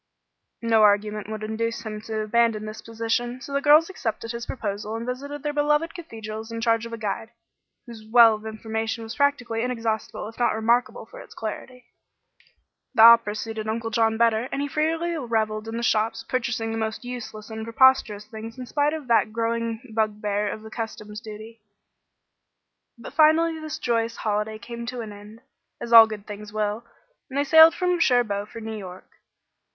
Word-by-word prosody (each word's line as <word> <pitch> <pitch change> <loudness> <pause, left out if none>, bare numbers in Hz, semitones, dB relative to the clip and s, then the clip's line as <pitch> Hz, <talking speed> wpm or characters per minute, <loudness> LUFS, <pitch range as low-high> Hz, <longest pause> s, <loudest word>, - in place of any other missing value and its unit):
No 225 -1 +4
argument 210 0 +2
would 215 -1 -5
induce 230 +2 -2
him 215 -1 -6
to 220 -1 -2
abandon 215 0 +1
this 215 0 -7
position; 230 +2 -2
so 280 - -9
the 280 - +1
girls 305 +3 +6
accepted 230 - -4
his 235 0 -6
proposal 210 -2 -4
and 230 +1 -4
visited 280 +3 -5
their 295 -1 -2
beloved 295 +2 +1
cathedrals 220 - -8
in 230 - -4
charge 230 0 +1
of 230 - -10
a - - -4
guide, 225 +1 -4 0.6
whose 230 -2 -11
well 230 -1 +7
of 215 +1 -6
information 220 +1 -4
was 225 +1 -7
practically 245 -5 0
inexhaustible 230 -4 -3
if 225 - -12
not 240 - +2
remarkable 235 +3 +1
for - - -13
its - - -13
clarity. 250 -1 -7 1.1
The 220 - +7
opera 230 -2 +7
suited 220 0 -5
Uncle 225 +1 -3
John 225 0 +2
better, 230 +1 +2
and 275 +1 -2
he - - -2
freely 325 +4 -1
revelled 220 -4 -1
in 225 +1 -4
the 235 - -3
shops, 220 0 +1
purchasing 235 -3 -2
the 225 - -3
most 220 +1 -3
useless 220 -4 -7
and 220 0 -5
preposterous 230 -3 +3
things 220 +2 -9
in 255 - -6
spite 290 +4 0
of 310 -4 -6
that 230 -2 +3
growing 230 +1 -2
bugbear 210 -1 -1
of 215 - -6
the 220 - -11
customs 215 -2 -6
duties. 220 +1 -10 1.4
But 235 - -10
finally 320 +1 +4
this 310 0 -5
joyous 230 -3 -1
holiday 210 0 -2
came 235 +1 -8
to 250 -1 -4
an 215 -2 -7
end, 210 +3 -13 0.4
as 235 - -4
all 225 -1 +11
good 210 -2 -7
things 210 0 -9
will, 215 +1 -2 0.5
and 270 - -5
they 285 - +3
sailed 320 +3 +7
from 360 -1 0
Cherbourg 215 -8 +2
for - - -9
New 225 0 -6
York. 185 -3 -9
225 Hz, 180 wpm, -24 LUFS, 215-250 Hz, 1.4 s, all